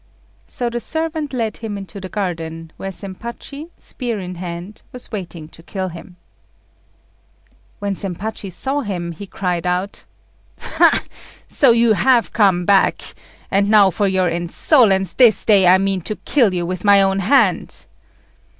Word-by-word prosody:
So 245 - -3
the 240 0 -2
servant 315 +3 -3
led 230 -4 -2
him 220 -3 -5
into 200 0 -9
the 185 - -7
garden, 165 -5 -4
where 195 - -5
Zempachi, 235 - -8
spear 240 -4 -4
in 185 -2 -6
hand, 175 +3 -7
was 250 - -7
waiting 175 -7 -6
to 165 - -16
kill 185 +2 -4
him. 175 +1 -11 1.6
When 200 -1 -2
Zempachi 195 +2 -5
saw 270 +11 -2
him, 180 -7 -4
he 195 +5 -9
cried 180 -2 -2
out 180 +3 -2 0.5
"Ha! - - +3 0.4
so 275 - +3
you 230 -1 +4
have 245 +2 +2
come 190 -5 +3
back; 200 0 +2 0.4
and 200 +1 +2
now 205 -3 +6
for 200 +3 0
your 190 -1 +1
insolence, 190 - +2
this 240 -5 +4
day 200 -4 +5
I 185 +1 +7
mean 195 -1 -1
to 215 - -4
kill 240 -5 +2
you 175 -1 -2
with 185 +1 -4
my 200 -1 +6
own 195 0 +1
hand." 230 +9 +2
195 Hz, 150 wpm, -19 LUFS, 180-225 Hz, 1.6 s, I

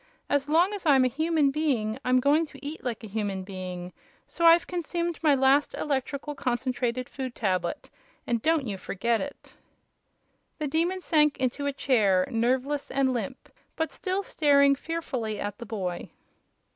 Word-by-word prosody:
As 285 0 +1
long 345 +6 +3
as 405 - -5
I'm 270 -3 +6
a - - +2
human 315 +1 +1
being 265 -8 0
I'm 255 0 +3
going 295 +5 +3
to 280 -1 -14
eat 305 +3 -6
like 235 -3 -4
a - - -6
human 200 -2 -3
being, 185 -2 -7 0.3
so 335 -1 +1
I've 335 +1 +7
consumed 345 -1 -3
my 300 -3 +4
last 270 +2 +3
Electrical 280 +1 -2
Concentrated 250 -1 -2
Food 260 -3 -6
Tablet 185 +2 -2 0.3
and 235 -2 0
don't 320 -1 +2
you 200 -4 -4
forget 230 +5 -1
it!" 285 - -8 1.0
The 305 - -3
Demon 340 +5 0
sank 300 -4 +3
into 265 +2 -1
a - - +1
chair, 215 -9 +2
nerveless 260 +5 0
and 265 -1 +1
limp, 225 -6 -5 0.2
but 320 -2 -1
still 380 +1 -2
staring 280 -5 +4
fearfully 260 -8 -4
at 205 0 -4
the 235 - -8
boy. 185 -5 -4
270 Hz, 160 wpm, -27 LUFS, 230-305 Hz, 1.0 s, I've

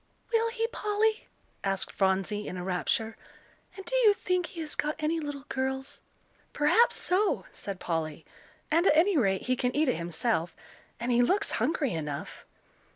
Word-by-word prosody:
"Will 455 0 +3
he, 455 -1 -1
Polly?" 430 0 0 0.4
asked 195 -1 0
Phronsie, 195 +2 0
in 185 - -5
a 180 - -4
rapture; 190 +5 -1 0.6
"and 390 - -8
do - - -2
you 435 -5 +6
think 365 -2 0
he 335 - -7
has 305 -2 -5
got 300 +1 -1
any 320 +1 0
little 290 -2 -5
girls?" 265 0 -3 0.5
"Perhaps 300 +11 +4
so," 390 +3 +1
said 195 -2 -6
Polly, 160 -2 -3 0.5
"and 335 +4 +4
at - - +5
any 370 +4 +4
rate, 195 -9 +2
he 255 - +1
can 250 0 -1
eat 305 +1 +3
it - - +1
himself. 170 +1 -1 0.4
And 240 +2 -1
he 240 0 +4
looks 390 +11 +2
hungry 265 - 0
enough." 150 -3 -5
265 Hz, 165 wpm, -29 LUFS, -, 0.6 s, you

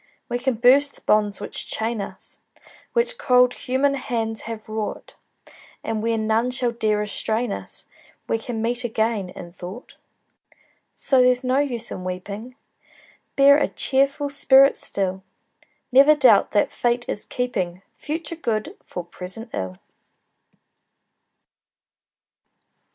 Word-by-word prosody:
We 245 0 -1
can 260 0 0
burst 265 +5 +4
the - - -19
bonds 210 -1 +2
which 205 - -4
chain 225 -1 -1
us, - - -8 0.5
Which 485 +1 +1
cold 250 -1 +4
human 270 +2 0
hands 225 -5 -3
have 220 -2 -7
wrought, 215 -1 -5 0.7
And 225 -1 -2
where 230 0 0
none 220 +2 +1
shall 250 -1 -1
dare 215 -2 0
restrain 220 +2 -1
us - - -4 0.4
We 225 - 0
can 225 -1 -4
meet 245 +2 -1
again, 220 -4 -1
in 175 -1 -10
thought. 185 +7 -10 1.0
So 265 -2 +3
there's 250 0 +3
no 255 +2 +2
use 245 -5 -2
in 185 - -6
weeping, 200 +7 -6 0.8
Bear 280 +1 +7
a - - +2
cheerful 275 +2 0
spirit 275 0 +5
still; 190 -1 -2 0.7
Never 280 +4 +7
doubt 250 -8 +5
that 205 - +1
Fate 240 0 0
is 205 - -3
keeping 190 -8 -3
Future 320 +2 -5
good 225 -9 -3
for 180 - -6
present 190 +6 -8
ill! 95 -1 -4
235 Hz, 130 wpm, -23 LUFS, 210-260 Hz, 1.0 s, Bear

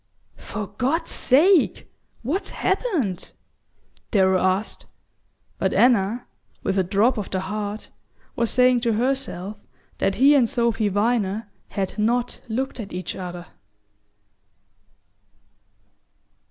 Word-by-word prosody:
"For 210 -1 -5
God's 255 - -1
sake, 325 +7 +3 0.4
what's 370 - -2
happened?" 345 - -1 0.8
Darrow 190 -3 +3
asked; 185 +3 -1 0.7
but - - 0
Anna, 235 -1 +3 0.4
with 195 0 0
a - - +3
drop 210 +6 +2
of 205 - -5
the 185 - -1
heart, 210 +2 -5 0.4
was 235 -3 +1
saying 250 0 +4
to 235 -1 +1
herself 230 -5 -2 0.4
that 195 - +1
he 275 +3 +6
and 255 -6 +4
Sophy 235 -3 +1
Viner 205 0 0 0.2
had 195 +1 -4
not 240 +3 0
looked 255 +3 -3
at 205 -3 -7
each 180 -1 -4
other. 180 -1 -6
220 Hz, 110 wpm, -23 LUFS, 195-250 Hz, 0.8 s, he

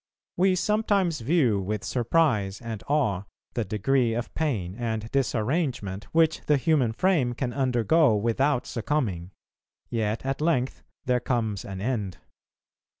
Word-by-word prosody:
We 185 +1 +3
sometimes 200 -4 +1
view 125 - +2
with 105 +2 -3
surprise 120 -6 +1
and 115 -4 -6
awe 105 -10 +1 0.3
the 120 - -1
degree 115 +4 +1
of 120 0 -4
pain 110 - -1
and 110 -1 -3
disarrangement 120 - -1
which 160 +3 +2
the 150 - +4
human 135 -5 +2
frame 140 -3 +1
can 125 0 -3
undergo 130 +1 +3
without 120 +5 +1
succumbing; 110 - -2 0.6
yet 110 +1 -1
at 135 +2 -2
length 145 -6 0 0.2
there 125 -1 +2
comes 115 -5 -1
an 95 -1 -7
end. 105 -5 -2
120 Hz, 130 wpm, -26 LUFS, 105-150 Hz, 0.6 s, the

